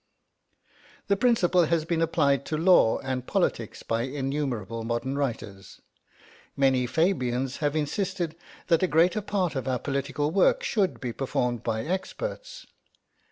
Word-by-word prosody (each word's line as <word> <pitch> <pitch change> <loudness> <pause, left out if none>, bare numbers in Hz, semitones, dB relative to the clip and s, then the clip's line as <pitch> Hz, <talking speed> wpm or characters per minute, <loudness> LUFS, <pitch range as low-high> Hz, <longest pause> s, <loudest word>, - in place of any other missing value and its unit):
The 200 - +4
principle 190 -6 +3
has 160 0 0
been 165 -1 0
applied 140 -4 +2
to 155 - -1
law 165 -9 +5
and 130 -1 -4
politics - - -1
by 115 0 -1
innumerable 130 -5 -3
modern 120 +4 -2
writers. 115 -8 -4 0.8
Many 130 -2 +3
Fabians 130 -5 0
have 145 -1 -1
insisted 165 +2 -2 0.3
that 165 -2 +3
a 185 - +3
greater 175 +6 +3
part 195 -4 -1
of 130 -1 -3
our 130 -1 +1
political 140 +3 -2
work 190 +2 +3
should 200 -5 0
be 125 -3 -4
performed 125 -2 -1
by 110 -1 -2
experts. - - -5
145 Hz, 135 wpm, -26 LUFS, 125-175 Hz, 0.8 s, law